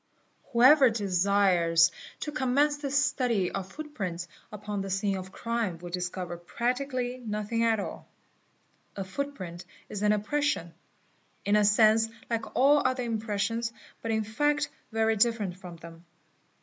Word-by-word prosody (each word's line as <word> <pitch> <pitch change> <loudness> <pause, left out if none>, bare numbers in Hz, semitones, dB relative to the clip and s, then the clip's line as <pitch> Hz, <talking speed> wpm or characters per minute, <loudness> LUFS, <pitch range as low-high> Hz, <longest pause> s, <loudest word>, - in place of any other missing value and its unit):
Whoever 260 +2 +7
desires 185 -5 +3 0.3
to 300 - -3
commence 290 +1 +2
the 290 -1 -4
study 250 -8 +1
of 195 -1 -5
footprints 195 - -5 0.2
upon 210 -1 -4
the 195 - -5
scene 195 +1 0
of 185 -1 -5
the 190 - -15
crime 230 -7 -2
will 175 +1 -9
discover 180 -1 -4
practically 250 +6 -2
nothing 220 0 -2
at 225 -2 +3
all. - - -6 0.9
A 195 - -3
footprint 190 -5 -5 0.3
is 205 - -5
an 210 0 +3
impression, 210 - 0 0.7
in 205 - +3
a 210 - +5
sense 215 +2 +5 0.2
like 230 -1 -3
all 285 +3 +5
other 255 -1 0
impressions 225 0 -1 0.3
but 230 - -4
in 220 -1 +1
fact 295 +7 0 0.2
very 225 0 +2
different 210 -4 +1
from 180 -2 -10
them. 165 0 -12
215 Hz, 140 wpm, -28 LUFS, 190-250 Hz, 0.9 s, Whoever